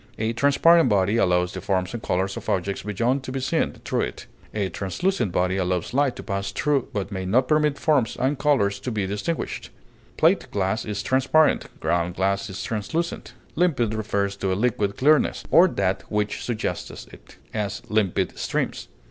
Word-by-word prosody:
A 110 +1 -1
transparent 145 +4 +5
body 100 +1 +2
allows 90 -3 +2
the 95 - -5
forms 95 -1 -1
and 120 - -4
colors 95 +2 -1
of - - -6
objects 95 +1 -1
beyond 115 +7 0
to 130 - -7
be 135 - -2
seen 130 - 0
through - - 0
it; 60 - -4 0.3
a 100 -3 -1
translucent 100 - -1
body 90 +2 +1
allows 90 0 -1
light 140 -1 +2
to - - -8
pass 100 -2 -3
through, 145 -4 0
but 100 -1 -3
may 95 -1 -3
not 120 +8 +2
permit 150 -1 +2
forms 140 -8 +1
and 135 +2 0
colors 120 -10 +2
to - - -4
be 105 -3 -1
distinguished; 105 - -3 0.5
plate - - +3
glass 100 +2 -1
is 105 -2 -3
transparent, 135 +4 +2
ground 85 0 0
glass 100 +3 0
is 95 - -5
translucent. 160 +11 -3 0.2
Limpid 140 -11 +1
refers 100 -2 -1
to 95 -1 -1
a - - +1
liquid 105 -3 0
clearness, 150 +3 +3
or 175 +3 +7
that 95 - -1
which 105 -1 -1
suggests 120 -3 -4
it; - - -16 0.2
as, 105 -3 -3
limpid 105 -4 0
streams. - - -2
105 Hz, 175 wpm, -24 LUFS, 95-130 Hz, 0.5 s, or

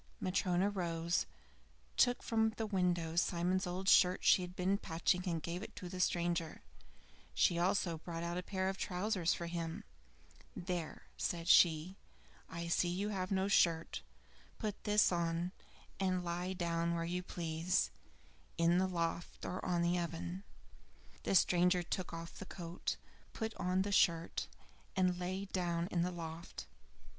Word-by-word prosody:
Matryona 185 +1 +1
rose, 170 -3 -1 0.7
took 245 0 +3
from 220 -1 +2
the 225 - -1
window 175 -5 0
Simon's 180 +2 +1
old 185 +2 -4
shirt 180 -1 +5
she - - +6
had 180 0 -6
been 190 +2 +1
patching, 175 0 +1
and 165 -3 -2
gave 170 +2 -3
it - - -8
to 180 - -7
the 185 0 -6
stranger. 170 -2 0 0.7
She 170 - +3
also 175 -2 +1
brought 165 0 -5
out 170 0 -2
a 180 - -1
pair 190 0 -2
of 190 0 -2
trousers 185 -2 0
for 170 - -5
him. 170 -1 -4 0.7
"There," 175 -3 -4
said 170 -1 -2
she, 175 +1 +5 0.5
"I 170 +1 -5
see 175 +1 +2
you 195 +4 -1
have 185 -3 -2
no 190 0 +1
shirt. 170 -4 +2 0.6
Put 210 -3 -4
this 210 -2 +4
on, 170 0 0 0.5
and 185 -2 0
lie 175 +2 -2
down 170 -2 0
where 165 0 -1
you 180 +2 -2
please, 170 0 0 0.7
in 170 +1 +4
the 190 - +2
loft 170 -1 -3
or 185 - -4
on 175 -1 +1
the 175 +1 +2
oven." 170 +2 -4 0.8
The - - +1
stranger 180 0 +4
took 180 +1 -3
off 165 0 -7
the 200 - -7
coat, 175 -1 -4 0.4
put 220 0 -3
on 185 +1 +1
the 200 - -3
shirt, 170 -4 +2 0.5
and 180 -1 +2
lay 185 +2 -2
down 175 -3 -1
in 170 - +1
the 180 - +1
loft. 165 -1 -7
180 Hz, 155 wpm, -36 LUFS, 170-185 Hz, 0.8 s, she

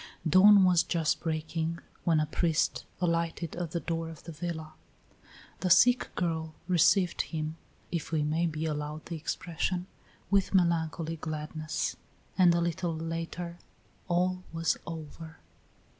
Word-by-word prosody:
Dawn 195 +4 +8
was 180 -2 +5
just 165 -2 0
breaking 160 0 -2 0.3
when 165 -2 +4
a 155 - +2
priest 160 +1 0
alighted 170 -2 -1
at 175 -2 -3
the 170 - -2
door 165 -1 -3
of 160 -2 -11
the 165 - -8
villa. 160 -1 -5 0.9
The 185 - -1
sick 245 +8 +5
girl 160 -3 -2
received 180 +1 +4
him, 155 -1 -4 0.4
if 170 -2 -3
we 155 -2 +1
may 160 +3 +1
be 155 0 -3
allowed 150 0 -3
the 170 - -5
expression, 175 +2 -2 0.5
with 200 0 +2
melancholy 165 -2 +1
gladness, 155 0 -3 0.4
and 180 -2 +6
a 170 - +2
little 170 0 -1
later 165 +2 -4 0.5
all 180 +1 +1
was 165 0 +1
over. 160 0 -8
165 Hz, 135 wpm, -30 LUFS, 160-175 Hz, 0.9 s, Dawn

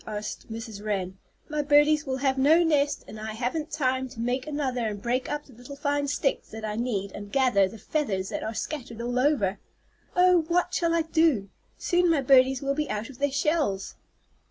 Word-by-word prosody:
asked 215 +1 -6
Mrs. 220 -2 -7
Wren. 190 -3 -2 0.3
"My 300 -1 -1
birdies 295 +1 +4
will 260 0 -1
have 265 0 +1
no 300 +6 +5
nest, 295 -3 +1
and 215 - -9
I 215 0 -5
haven't 260 +7 -2
time 260 -3 0
to 230 - -12
make 250 +4 -1
another 265 -6 -1
and 205 -1 -4
break 245 +4 -1
up 295 0 -3
the 265 - -17
little 245 +5 -10
fine 285 0 -1
sticks 275 -1 -1
that 220 0 -7
I 210 -1 -3
need 210 -4 -2
and 205 +1 -9
gather 250 -8 +3
the 225 - -10
feathers 200 -7 -2
that - - -4
are 220 - -4
scattered 245 -5 -5
all 245 +1 -1
over. 255 -9 +1 0.6
Oh, 360 -1 +5
what 355 +1 +1
shall 335 -2 +1
I 335 - +2
do? 315 - +2 0.3
Soon 355 -1 +2
my 320 -4 +3
birdies 265 0 +4
will 275 0 +1
be 300 +1 -2
out 215 +4 -3
of 245 - -16
the 285 +1 +2
shells." 285 - 0
265 Hz, 205 wpm, -27 LUFS, 220-295 Hz, 0.6 s, no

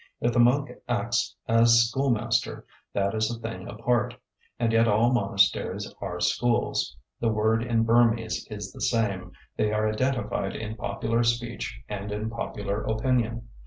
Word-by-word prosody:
If 120 0 +1
the 120 - +2
monk 130 +4 +4 0.2
acts 120 -1 0
as 115 0 +5
schoolmaster, 125 -2 0 0.3
that 100 0 0
is 110 0 +1
a 120 - -4
thing 115 0 -6
apart. 115 +3 0 0.4
And 115 -1 +1
yet 115 +1 +4
all 115 +3 +3
monasteries 100 -4 +1
are 90 0 -4
schools. 115 +7 0 0.2
The 115 - +1
word 110 +1 +2
in 115 -1 +1
Burmese 115 -1 +2
is 105 -3 -6
the - - -11
same; 100 -6 0 0.2
they 105 0 +1
are 110 0 +1
identified 120 -3 -1
in 110 0 -5
popular 110 +2 -1
speech 120 0 -2
and 105 0 -5
in 105 +2 -3
popular 105 -3 -3
opinion. 115 0 0
115 Hz, 150 wpm, -26 LUFS, 105-120 Hz, 0.4 s, as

